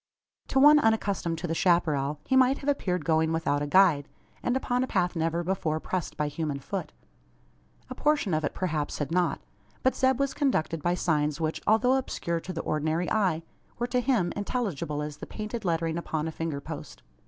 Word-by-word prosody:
To 270 - +2
one 295 +2 +8
unaccustomed 200 - +1
to 175 +2 -4
the 165 - -1
chapparal, 155 -5 +2
he 265 - +1
might 260 +1 +5
have 280 - -8
appeared 185 -10 -1
going 160 -1 +2
without 155 -3 0
a 145 - -1
guide, 160 -4 +4 0.3
and 245 +1 +1
upon 250 -1 0
a - - -2
path 180 -5 0
never 165 +1 0
before 165 -4 -1
pressed 180 +1 -4
by 150 - 0
human 150 -1 -3
foot. 140 - -5 1.0
A 255 - -6
portion 290 - +1
of 155 0 +1
it 145 - -2
perhaps 155 -5 -2
had 145 +1 -3
not. 175 -3 +1 0.4
But 260 - +3
Zeb 260 0 +2
was 275 0 0
conducted 165 - 0
by 175 +3 +1
signs 150 -3 0
which, 160 -1 -2
although 235 +5 +4
obscure 170 -10 -2
to 185 - -7
the 165 -2 -3
ordinary 155 +3 -1
eye, 185 -7 +1 0.3
were 240 - -1
to 250 0 0
him 235 -9 +1
intelligible 195 - -2
as 150 -1 -6
the - - -8
painted 215 0 -5
lettering 165 -1 0
upon 160 -2 -3
a - - -3
finger 160 -3 -3
post. 155 -1 -8
170 Hz, 195 wpm, -28 LUFS, 155-225 Hz, 1.0 s, one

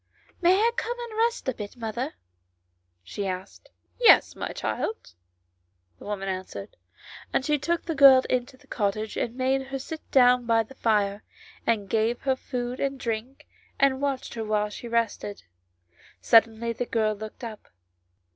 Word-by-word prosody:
" - - -33
May 355 +1 +5
I 455 +3 +3
come 475 0 -2
in 475 -1 -7
and 435 - -8
rest 465 - +1
a 260 - +1
bit, 210 +1 -8
mother 235 +5 -4 0.4
?" 90 0 -48
she 195 - -4
asked. 185 0 -6 0.2
" - - -41
Yes, - - +7
my - - -4
child," 440 - -4 0.9
the - - -12
woman 200 -2 -4
answered; 190 - -5 0.6
and 265 - 0
she 300 -1 +1
took 340 +4 -1
the 330 - -2
girl 270 -3 +8
into 255 +1 -2
the 285 - -23
cottage 215 -3 -2
and 235 0 -2
made 265 +1 0
her 270 0 -4
sit 310 +4 -7
down 250 -2 +5
by 225 -1 +4
the 225 - -14
fire, 205 -4 0 0.4
and 215 -4 +1
gave 225 +4 0
her 265 -1 +1
food 250 -1 -4
and 275 -1 -2
drink, 235 +3 -4 0.3
and 270 -1 +3
watched 275 -2 -2
her 225 - -4
while 210 -1 0
she 235 - -8
rested. 230 -3 -2 0.8
Suddenly 225 0 +4
the 245 +1 -4
girl 215 -2 +1
looked 215 +4 -9
up. 220 -3 -8
235 Hz, 175 wpm, -26 LUFS, 215-270 Hz, 0.9 s, girl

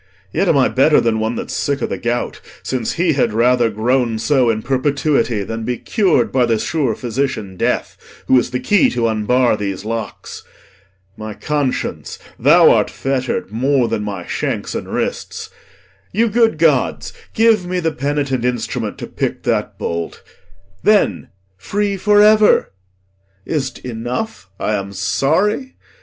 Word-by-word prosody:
Yet 195 - +1
am 160 - +4
I 130 - +4
better 145 +3 +4
Than 115 -1 +1
one 110 +2 -1
that's - - -5
sick 140 0 -1
o' - - -1
th' - - -5
gout, 120 +1 -2 0.2
since 125 -4 -2
he 170 -1 +1
had 125 -5 +1
rather 120 +1 +3
Groan 115 +2 0
so 130 +1 +2
in 110 -1 -1
perpetuity 135 -4 0
than 115 +3 -5
be 125 +1 -2
cur'd 185 - +1
By 125 -2 +2
th' 115 -2 +1
sure 135 -7 -1
physician 120 -5 -3
death, - - -1 0.3
who - - +3
is 120 - -2
the 125 0 -2
key 195 +10 +3
T' 125 - -4
unbar 115 +2 +2
these 100 -1 -4
locks. 115 0 -5 0.7
My 110 -1 -7
conscience, 145 -4 -2 0.2
thou - - +6
art - - +2
fetter'd 130 -6 -2
More 130 +2 +1
than 105 - -2
my 100 -4 -5
shanks - - -3
and - - -5
wrists; - - -4 0.6
you 225 +4 +2
good 225 -4 +2
gods, 150 -6 +1 0.2
give 220 -5 +3
me 180 0 -1
The 165 -2 0
penitent 140 -3 -1
instrument 125 0 -2
to - - -6
pick - - -3
that - - -1
bolt, 85 0 -4 0.6
Then, 210 -1 +2 0.3
free 200 - -1
for 205 +2 +4
ever! 215 0 +5 0.7
Is't 140 -4 -2
enough 115 -4 -4
I 105 - -1
am 100 -1 -3
sorry? 155 - 0
125 Hz, 155 wpm, -18 LUFS, 110-155 Hz, 0.7 s, thou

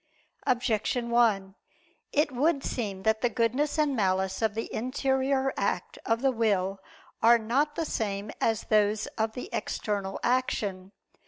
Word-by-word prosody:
Objection 235 0 0
1: 210 -5 +3 0.6
It 295 0 +2
would 280 +3 +1
seem 200 -6 -3
that 220 +1 +2
the 245 - +2
goodness 255 +7 0
and 300 -3 +2
malice 190 -2 0
of 220 -2 +1
the 225 - -2
interior 265 +2 0
act - - -2
of 230 +2 +1
the 270 - +4
will 200 -5 0 0.4
are 235 +1 +7
not 265 +7 0
the 330 - -1
same 205 -5 -2
as 225 -1 +1
those 215 0 +2
of 220 0 0
the 250 - -6
external 200 -2 -2
action. 210 -7 0
230 Hz, 145 wpm, -28 LUFS, 205-260 Hz, 0.6 s, are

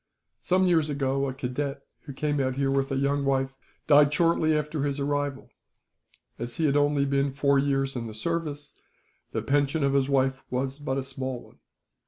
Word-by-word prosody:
Some 185 +1 +2
years 160 -4 +3
ago 140 -1 0
a - - -4
cadet, 135 +2 -3 0.2
who 140 - -7
came 145 +1 -1
out 130 -1 0
here 135 0 +1
with 135 0 0
a - - 0
young 140 +1 +1
wife, 135 -1 0 0.3
died 145 -1 +6
shortly 160 0 +2
after 150 0 -2
his 140 0 -1
arrival. 145 -1 -2 0.9
As 120 0 -5
he 160 - 0
had 140 -1 +2
only 145 -1 +3
been 140 0 +1
four 140 +1 +2
years 135 -1 0
in 115 -2 -3
the 110 - -8
service, 150 +2 -3 0.6
the - - -2
pension 145 +2 +1
of 140 0 +2
his 140 -1 +2
wife 130 -1 +1
was 130 +2 -2
but 135 -2 -2
a 135 - -1
small 130 -2 -5
one. - - -20
140 Hz, 190 wpm, -27 LUFS, 135-145 Hz, 0.9 s, died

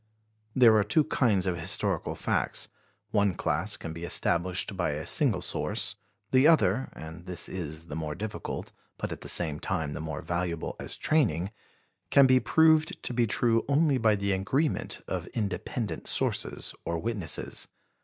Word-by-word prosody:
There 120 -4 +7
are 105 - +4
two 130 +10 +3
kinds 105 -10 +2
of 90 -3 -1
historical 95 0 0
facts: - - -1 0.4
one 100 -4 +2
class 85 +8 0
can 80 - -6
be 85 +1 -8
established 90 +3 +1
by 90 -5 0
a 75 +1 -4
single - - +1
source, - - -1 0.4
the 130 +3 +6
other 130 - +3
and 80 +3 -10
this 90 -2 -3
is 80 -3 -5
the 75 - -7
more 80 -2 -3
difficult, 105 0 -5 0.3
but - - -4
at - - -6
the - - -8
same 75 -4 +1
time 80 -6 -2
the - - -5
more 80 -1 -5
valuable 85 -2 -2
as - - -6
training 100 - +1 0.6
can 140 - +7
be 130 -1 +5
proved 160 +4 +3
to - - -3
be 120 -1 +2
true 115 +1 +2
only 145 -1 +3
by 110 -2 +4
the 100 0 -1
agreement 130 +11 -1
of - - -3
independent 110 +1 -3
sources - - 0
or 85 - -2
witnesses. 100 -5 -2
100 Hz, 165 wpm, -28 LUFS, 85-120 Hz, 0.6 s, There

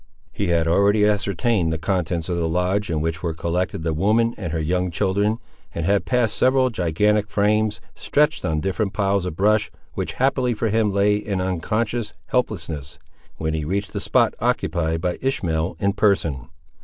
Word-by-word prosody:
He 100 - -2
had 85 -1 +2
already 100 +4 +4
ascertained 100 -3 +1
the 80 - -1
contents 85 -1 -1
of 90 - -1
the 85 -1 0
lodge 90 +4 0
in 80 -2 -1
which 80 0 -2
were 85 -3 -2
collected 85 +2 -2
the 80 -1 0
woman 110 +8 +2
and 90 -6 -5
her 80 - -1
young 90 +3 0
children, 100 +4 0 0.4
and 85 - -2
had 100 +2 +2
passed 120 -4 +1
several 130 0 +3
gigantic 105 +3 +1
frames, 105 +1 +1
stretched 150 +2 +1
on 80 -4 0
different 95 +2 -1
piles 100 -2 +1
of 80 - -5
brush, 105 +3 +2 0.2
which - - -3
happily 130 -2 +1
for 110 +1 -1
him 110 -1 +2
lay 100 +1 +3
in 105 -2 -3
unconscious 105 +5 -2
helplessness, 85 - -2 0.4
when 80 0 -2
he 80 -1 -2
reached 100 +6 -2
the - - -2
spot - - +2
occupied 80 -1 0
by 90 -1 -2
Ishmael 85 - -1
in 100 0 +1
person. 80 - +1
95 Hz, 175 wpm, -22 LUFS, 85-105 Hz, 0.4 s, already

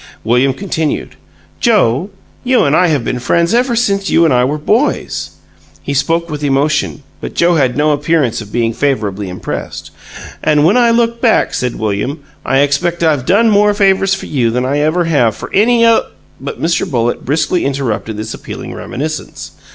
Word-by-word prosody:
William 125 +4 +2
continued: 160 0 -3 0.5
"Joe, 190 - +2 0.3
you 255 0 +3
and 140 0 +2
I 180 - +4
have 145 -8 0
been 125 - -2
friends 170 - +1
ever 245 0 +2
since 200 -4 0
you 165 - +4
and 155 - +3
I 125 0 +3
were 145 +4 0
boys." 220 - -1 0.5
He 140 - -3
spoke 165 +4 0
with 150 -2 -6
emotion, 145 +1 0 0.2
but - - -7
Joe 175 +1 +3
had 130 -3 +1
no 150 +1 +2
appearance 145 -5 0
of 105 -1 -11
being 115 -1 0
favorably 105 -8 -2
impressed. 90 - -6 0.5
"And 150 -1 +3
when 185 - +4
I 240 -1 +4
look 235 0 +1
back," 230 -3 +2
said 125 -1 -2
William, 110 +8 -3 0.2
"I 135 - +2
expect 170 +5 0
I've 150 -6 +1
done 225 +4 +4
more 205 0 +3
favors 195 -1 +2
for 195 - -8
you 125 -6 0
than 125 +2 -1
I 140 +3 0
ever 155 +4 +1
have 135 -10 +1
for - - -9
any 230 +3 +4
oth 230 -1 +4 0.2
" - - -33
But - - -6
Mr. 165 +1 0
Bullitt 120 -2 -1
briskly 160 +5 0
interrupted 125 -6 -2
this 110 +1 -5
appealing - - -8
reminiscence. 155 +3 -6
150 Hz, 180 wpm, -14 LUFS, 125-195 Hz, 0.5 s, I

